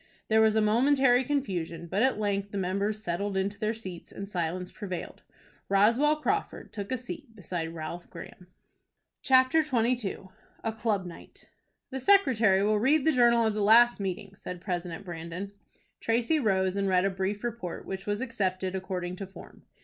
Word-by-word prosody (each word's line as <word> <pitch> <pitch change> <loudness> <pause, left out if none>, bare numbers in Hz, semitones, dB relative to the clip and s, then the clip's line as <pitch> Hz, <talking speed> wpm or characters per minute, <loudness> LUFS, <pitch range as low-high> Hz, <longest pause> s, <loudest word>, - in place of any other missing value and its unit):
There 220 0 +5
was 220 -1 +4
a 220 - +4
momentary 250 +3 +4
confusion, 185 - -2
but 190 +5 -1
at 260 -2 +3
length 200 -1 -1
the 200 - -5
members 200 +3 -1
settled 195 +3 -2
into 200 +1 -2
their 215 -1 0
seats, 185 -6 -9
and 200 - -7
silence 180 -1 -3
prevailed. 185 -5 -6 0.5
Roswell 230 +10 +4
Crawford 400 +7 -2
took 200 0 -6
a 255 - 0
seat 250 0 -9
beside 170 -4 -5
Ralph 165 +2 -6
Graham. 180 - -11 0.7
CHAPTER 260 +4 +5
XXII. 235 -8 -1 0.3
A 225 - 0
CLUB 215 -3 -1
NIGHT. 175 - -12 0.5
"The 265 - -3
secretary 240 - +4
will 210 0 +2
read 270 +5 +3
the 320 - +5
journal 235 -3 +4
of 220 - +1
the 210 - -2
last 235 +3 +6
meeting," 195 0 -4
said 180 -2 -8
President 175 -1 -4
Brandon. 170 +3 -6 0.5
Tracy 235 +7 +1
rose, 190 -6 +1
and 200 0 0
read 185 0 +3
a 195 - +1
brief 190 +3 -3
report, 235 -7 -5
which 190 +1 -6
was 205 +2 -1
accepted, 190 -7 -2
according 185 -1 -4
to 195 - -6
form. 195 - -14
205 Hz, 170 wpm, -28 LUFS, 185-235 Hz, 0.7 s, last